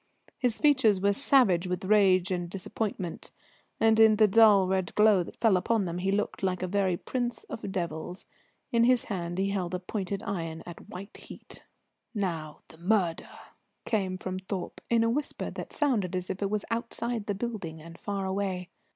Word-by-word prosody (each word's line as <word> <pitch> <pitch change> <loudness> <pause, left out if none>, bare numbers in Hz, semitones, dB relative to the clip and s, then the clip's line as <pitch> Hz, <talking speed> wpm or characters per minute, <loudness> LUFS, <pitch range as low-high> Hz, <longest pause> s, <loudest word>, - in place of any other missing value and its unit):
His 245 -4 +1
features 260 -10 +4
were 200 +1 +2
savage 200 -8 +3
with 180 +1 -3
rage 190 -3 +4
and 175 -1 -2
disappointment, 190 -1 -4 0.5
and 220 0 +4
in 220 -1 +7
the 215 0 +5
dull 210 -2 +6
red 190 -1 -1
glow 210 -3 +5
that 170 - -7
fell 225 -4 +4
upon 215 +2 +1
them 175 0 -3
he 190 +2 0
looked 205 +1 -1
like 185 -1 -1
a - - -1
very 190 -2 +1
prince 245 +3 -3
of 205 -3 -6
devils. 175 0 -4 0.5
In 235 0 +4
his 250 -1 +4
hand 175 -3 -4
he 195 +1 0
held 185 -3 -2
a - - -2
pointed 195 +1 -4
iron 165 -5 -4
at 175 - -11
white 195 +3 -9
heat. - - -11 0.5
"Now 165 -7 -3
the 160 - -16
murder!" 180 -2 0 0.6
came 190 -4 -1
from 185 0 -4
Thorpe 190 -1 -5
in 230 -1 +3
a 230 - +2
whisper 290 +4 -3
that - - -7
sounded 220 - 0
as 180 0 -2
if 190 - -6
it 200 - 0
was 210 0 -2
outside 230 -1 -2
the 205 - -1
building 195 -7 -5
and 165 +2 -11
far 200 +1 -4
away. 190 -2 -2
195 Hz, 185 wpm, -28 LUFS, 180-220 Hz, 0.6 s, in